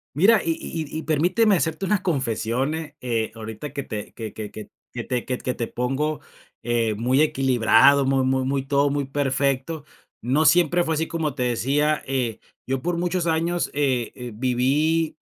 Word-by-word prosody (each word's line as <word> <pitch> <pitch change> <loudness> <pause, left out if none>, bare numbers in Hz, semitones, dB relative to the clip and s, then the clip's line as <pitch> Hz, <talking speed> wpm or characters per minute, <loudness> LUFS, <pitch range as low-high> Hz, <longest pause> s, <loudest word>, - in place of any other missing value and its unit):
Mira, 200 +7 +5
y 165 - 0
y 165 - -5
y - - -1
y - - -6
permíteme 185 +7 +3
hacerte 160 +2 -1
una 200 +1 +1
confesión, 130 - -1
¿eh?, 155 -2 -6
eh, 115 -3 -1
ahorita 110 +6 -7
que 140 - -3
te 105 -3 -6
que 110 -2 -7
que 105 -1 -6
que 110 - -10 0.2
que 120 -1 -5
te 125 -2 -2
que 125 -1 -2
t - - -16
que 125 - -1
te 115 - -3
pongo, 135 +4 -2 0.4
eh, 115 -2 0
muy 125 +6 +2
equilibrado, 135 -1 +4
mu 135 -1 +2
mu 130 0 +1
muy, 135 +1 -1
todo 140 +1 +2
muy 140 -1 -1
perfecto, 140 +2 -1 0.4
no 140 +6 +2
siempre 175 0 +4
fue 160 -2 -1
así, 160 +1 -1
como 155 -4 -2
te 125 - -1
decía, 140 +5 +1
eh, 125 -4 -1 0.3
yo 135 -1 -1
por 175 0 -1
muchos 175 0 -1
años, 170 +2 0
eh, 125 -4 -1
viví 135 +7 +1
140 Hz, 185 wpm, -23 LUFS, 125-160 Hz, 0.4 s, Mira